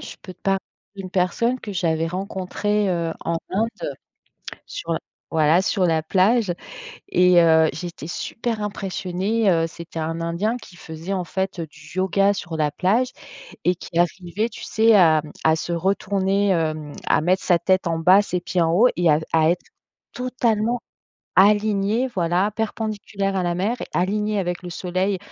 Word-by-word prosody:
je - - -9
peux 185 - -9
te - - -28
parler 195 0 +1 0.4
d'une 190 -2 -7
personne 215 +8 0
que 210 - -6
j'avais 165 -3 0
rencontrée, 195 +3 -1
heu, 170 -2 -1
en 170 - 0
Inde, 230 - -2 0.8
sur 165 -1 -3 0.4
voilà, 160 +2 +4
sur 190 -1 0
la 160 -2 +1
plage 195 +3 +2 0.5
et 180 -1 +5
heu, 160 -1 +5
j'étais 175 -4 -7
super 225 +5 -3
impressionnée, 195 +1 -1
heu, 165 -2 +2
c'était 165 0 -10
un 165 +1 -3
Indien 175 +8 -1
qui 200 -6 -14
faisait, 165 +3 -6
en 185 -2 -1
fait, 190 +1 -3
heu, 165 - -2
du 150 0 -15
yoga 195 +2 +2
sur 175 -4 -5
la 150 -1 +1
plage 215 - +1 0.5
et 180 - +4
qui 170 - -7
arrivait, 175 +5 0
tu 215 - -10
sais, 225 0 +4
à, 160 -5 +6
mmh, 150 - -10
à 160 0 +5
se 160 - -4
retourner, 195 +2 +1
hem, 155 -4 -1 0.2
à - - +3
mettre 185 +4 +2
sa 175 - +4
tête 185 +1 +1
en 165 -1 -1
bas, 185 +5 +6
ses 180 -3 -3
pieds 180 +1 -1
en 165 -1 +2
haut 230 +8 +5
et 175 -2 +3
à 150 - +4
à 160 -1 +4
être 180 - -2 0.5
totalement 240 -2 0 0.6
aligné, 210 +3 +3
voilà, 180 +3 +1
perpendiculaire 210 -2 -3
à 185 - 0
la 175 0 0
mer 200 +7 0
et - - -5
aligné 210 +3 0
avec 175 -1 -3
le 180 - -6
soleil 185 +3 -1
185 Hz, 175 wpm, -22 LUFS, 170-205 Hz, 0.8 s, à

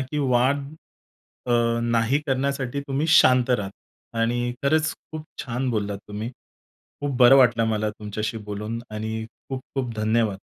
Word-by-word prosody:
की 135 +3 -3
वाद 135 +1 +2 0.8
अ, - - -2 0.3
नाही 115 +3 +2
करण्यासाठी 135 0 -1
तुम्ही 140 +3 0
शांत 130 -6 +5
राहता. 105 0 -4
आणि 120 +1 0
खरंच 155 +2 +2 0.2
खूप 155 -1 -6 0.2
छान 125 0 -2
बोललात 100 -3 -2
तुम्ही. 105 +3 -4 0.7
खूप 145 -2 -2
बरं 125 +1 +8
वाटलं 120 -3 +5
मला 110 -1 0
तुमच्याशी 105 +1 -4
बोलून 105 +3 -4
आणि 110 +1 -4 0.2
खूप-खूप 130 -2 -4
धन्यवाद. 110 -2 +1
120 Hz, 130 wpm, -24 LUFS, 110-135 Hz, 0.8 s, बरं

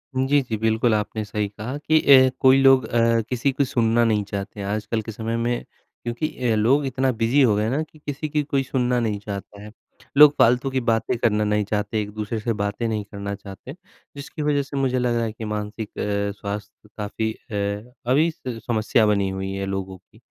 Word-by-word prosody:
जी, 135 +2 +3
जी, 120 -4 -4
बिल्कुल 110 +1 +2
आपने 110 0 -1
सही 105 0 -2
कहा 110 +7 -6
कि 155 +2 +2 0.3
अ, - - +2
कोई 130 0 +6
लोग 135 -1 +6
अ, 115 -1 +2
किसी 125 +2 0
को 135 +2 0
सुनना 120 -2 +2
नहीं 105 -2 +2
चाहते 100 +1 -6
हैं 100 - -4
आजकल 110 +2 -2
के 110 - -7
समय 115 +1 -3
में, 120 +1 -1 0.4
क्योंकि 120 +6 -2 0.2
अ, - - +2
लोग 130 +7 +3
इतना 130 0 0
बिज़ी 120 +4 +2
हो 115 -6 +4
गए 105 - 0
हैं 110 - 0
ना 140 +4 0
कि 155 0 -17
किसी 150 +1 -4
की 150 0 0
कोई 140 -1 0
सुनना 125 -2 0
नहीं 110 -3 -1
चाहता 100 0 -7
है। 105 - -10 0.5
लोग 150 0 +9
फालतू 125 +3 +4
की 130 0 0
बातें 115 +2 0
करना 105 -2 +1
नहीं 105 0 +1
चाहते 105 +1 -1
एक-दूसरे 105 +2 -4
से 115 +2 -1
बातें 100 +3 -2
नहीं 110 -2 -2
करना 100 0 -6
चाहते, 100 +6 -10 0.4
जिसकी 140 +2 -7
वज़ह 145 -1 +1
से 140 +1 -7
मुझे 130 -2 +1
लगा 120 -1 +1
है 115 - -2
कि 110 +1 -8
मानसिक 105 0 -4
अ, 100 0 -1
स्वास्थ्य 105 +1 -7
काफ़ी 110 +1 -2
अ, 105 +3 -5 0.2
अभी 155 +5 +4
स 125 -7 -7
समस्या 110 -1 +2
बनी 100 -2 +2
हुई 95 0 -4
है 95 0 -3
लोगों 95 -1 -4
की। 95 +3 -25
110 Hz, 210 wpm, -23 LUFS, 105-130 Hz, 0.5 s, लोग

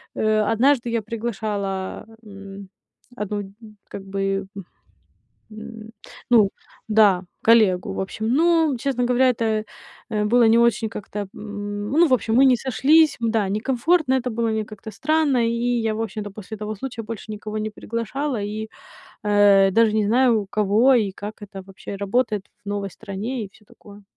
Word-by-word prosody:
Э, 215 0 +2
однажды 240 +3 +2
я 230 -1 0
приглашала, 210 -4 -4 0.2
м, 200 -1 -11 0.5
одну, 210 -2 -3
м, 195 0 -11 0.3
как 195 - -8
бы, 195 0 -2 1.1
м, 220 0 -10 0.4
ну 215 -5 +5 0.4
да, 205 -4 +4 0.2
коллегу, 215 -5 +4
в - - -4
общем. 220 +3 -4
Но, 325 -2 +3
честно 250 -2 -1
говоря, 250 +1 +3
это, 220 -2 -1 0.5
э, 210 -1 0
было 235 +2 +4
не 230 +1 +5
очень 235 -1 +2
как-то, 210 -1 -7
м, 205 0 -6
ну 330 +5 +4
в - - -1
общем, 225 -2 -1
мы 270 - +6
не 255 -2 +5
сошлись. 290 +6 +3
М, 230 -1 0
да, 215 -4 0
некомфортно 260 - +1
это 250 -1 -1
было, 230 0 -1
мне 220 -1 -1
как-то 215 +1 -10
странно. 285 -1 +1
И - - 0 0.3
я, 220 -1 -1
в 220 - -4
общем-то, 210 -1 -5
после 215 +2 -9
того 215 +1 -5
случая 240 0 -6
больше 220 0 -7
никого 215 +1 -5
не 215 0 -3
приглашала, 230 +4 -4
и, 215 +1 -5 0.6
э, 205 -2 +5
даже 225 +1 +4
не 215 -1 +1
знаю, 235 -1 +3
у - - -11
кого 215 +6 +3
и 210 -5 +2
как 210 +2 -9
это 195 -2 -9
вообще 195 +1 -9
работает 210 0 -1 0.2
в - - -9
новой 200 -1 -3
стране 220 +5 -5
и - - -9
всё 215 - -22
такое. 205 0 -16
215 Hz, 170 wpm, -22 LUFS, 205-235 Hz, 1.1 s, мы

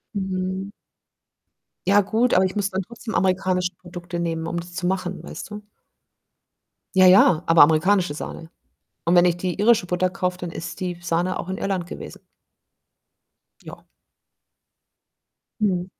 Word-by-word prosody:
Mhm. 190 0 -3 1.2
Ja, 200 +1 +5
gut, 225 +5 +1
aber 185 +1 +4
ich 185 - -3
muss 200 -1 -1
dann 190 0 -1
trotzdem 225 +3 -8
amerikanische 185 -1 +1
Produkte 175 -1 -7
nehmen, 165 -1 -2
um 170 - -3
das 175 +1 -10
zu 180 0 -2
machen, 185 0 -2
weißt - - -9
du? 210 0 -8 1.3
Ja, 185 - +7
ja, 180 -3 +6
aber 165 0 +5
amerikanische 165 +2 +3
Sahne 160 +2 -7 0.5
und 170 +1 +2
wenn 175 - +6
ich 175 -1 +2
die 175 0 -4
irische 215 -2 +4
Butter 180 +1 0
kaufe, 180 -1 -2
dann 180 -1 -6
ist 165 +1 -7
die 180 -2 -3
Sahne 175 +2 -1
auch 180 - -6
in 190 - -3
Irland 190 -3 -2
gewesen. - - -9 1.4
Ja. - - -12 1.8
Mhm. 185 -4 +1
185 Hz, 145 wpm, -23 LUFS, 175-190 Hz, 1.8 s, Ja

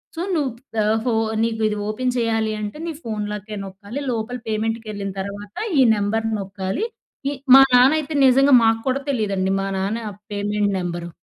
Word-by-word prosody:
So, 330 - -4
"నువ్వు 285 -5 0 0.2
the - - 0 0.3
ఫో 245 - +1 0.3
నీకు 225 -1 -1
ఇది 210 - -1
ఓపెన్ 250 +4 -1
చేయాలి 225 -2 0
అంటే, 210 +6 -5
నీ - - -2
ఫోన్‌ 215 -3 -3
లాకే 210 +1 -6
నొక్కాలి. 200 +7 -7
లోపల 230 +2 -3
పేమెంట్‌కి 225 +1 -2
ఏళ్ళిన 200 -1 -4
తర్వాత, 200 +1 -7 0.3
ఈ - - +7
నెంబర్ 210 +2 -1
నొక్కాలి" 195 - -3 0.5
ఈ - - -3 0.2
మా 270 - +10
నాన్న 250 +2 +7
అయితే, 310 +1 -5
నిజంగా 270 +2 +6
మాకు 225 0 +3
కూడా, 270 +2 0
తెలీదండి! 195 -5 0
మా 195 - -2
నాన్న 215 +4 -2 0.3
పేమెంట్ 205 0 0
నెంబరు. 175 -1 -4
220 Hz, 170 wpm, -22 LUFS, 200-240 Hz, 0.5 s, మా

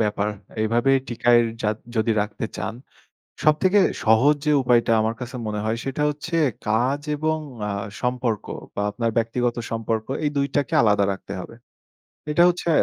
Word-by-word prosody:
ব্যাপার। 105 -1 0 0.4
এভাবেই 120 +5 +3
টিকায় 120 0 +4 0.2
যাদ 105 0 0 0.2
যদি 110 +1 +2
রাখতে 105 +2 -3
চান, - - -4 0.7
সব 155 - +5
থেকে 190 +2 +4 0.3
সহজ 115 +7 +5
যে 150 - +4
উপায়টা 120 -2 +3
আমার 110 +1 0
কাছে 125 +1 -6
মনে 105 -1 -2
হয় 110 +1 -1
সেটা 135 +2 -2
হচ্ছে 150 +3 -4 0.3
কাজ 125 +6 +1 0.2
এবং 155 +1 0 0.3
আ - - -2 0.3
সম্পর্ক 125 -3 -1 0.3
বা 100 - -2
আপনার 115 +2 -1
ব্যক্তিগত 120 +1 0
সম্পর্ক 115 -1 -2 0.2
এই 145 - +2
২ 140 0 +2
টাকে 140 -4 0
আলাদা 105 -2 +3
রাখতে 95 0 -8
হবে। 115 - -10 0.8
এটা 170 +3 +4
হচ্ছে 175 -1 -2
120 Hz, 160 wpm, -23 LUFS, 110-140 Hz, 0.8 s, সব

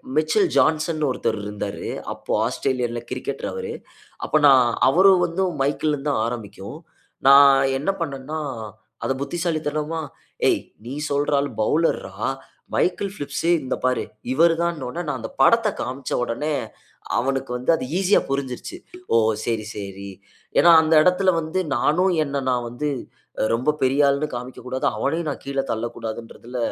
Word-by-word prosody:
Mitchell 260 - +3
Johnson 155 0 +2
னு 150 - +2
ஒருத்தர் 115 -3 -1
இருந்தாரு. 105 0 -5 0.3
அப்போ - - -9
ஆஸ்திரேலியா 125 0 -1
ல - - -4
கிரிக்கெட்டர் 130 +2 -4
அவரு." 465 -1 -5 0.5
அப்ப 155 - +2
நான் 130 -3 +7 0.2
"அவரும் 185 +4 +5
வந்து 175 +2 -1 0.2
மைக்கேல் 150 +2 0
இருந்து 145 0 -2
தான் 110 - 0
ஆரம்பிக்கும்." 115 +2 -7 0.5
நான் 140 0 +9 0.3
என்ன 145 - -2
பண்ணன்னா, 145 0 -4 0.6
அத - - 0
புத்திசாலித்தனமா, 155 0 -2 0.5
"ஏய் - - +2 0.2
நீ 125 - -6 0.2
சொல்ற 145 +1 0
ஆள் 140 0 -1
பவுலர் 160 +9 +2
றா, 95 - -14 0.6
மைக்கேல் 195 +2 0
பிலிப்ஸ் 145 -3 -4 0.2
இந்த 130 - -2
பாரு, 125 -1 +1 0.3
இவர்தான்"னு 165 -1 +2
உடனே 170 +7 -4
நான் - - -2
அந்த - - -6
படத்த 230 -1 +5
காண்பிச்ச 130 +1 -5
உடனே, 145 +6 -2 0.6
அவனுக்கு 135 0 -1
வந்து 125 +1 -4
அது 160 - -4
ஈசியா 195 +1 +4
புரிஞ்சுருச்சு. 135 - -3 0.4
"ஓ! - - +5 0.3
சரி- 115 -2 -1
சரி." 100 -1 -7 0.5
ஏன்னா 170 - +7
அந்த 160 0 +1
எடத்ல 180 +2 +3
வந்து, 160 +3 -2 0.2
நானும் 180 +9 +2
என்ன 140 -1 -3
நான் 125 -1 0
வந்து 150 +6 -3 0.6
ரொம்ப 125 +5 +1
பெரிய 135 +2 +3
ஆள்னு 140 +2 +1
காண்பிக்க 125 +1 -6
கூடாது. 130 +1 -3
அவனையும் 155 +6 -1
நான் - - -6
கீழே 140 0 -1
தள்ளக்கூடாதுன்றதுல 115 +1 -6
140 Hz, 145 wpm, -23 LUFS, 125-165 Hz, 0.6 s, நான்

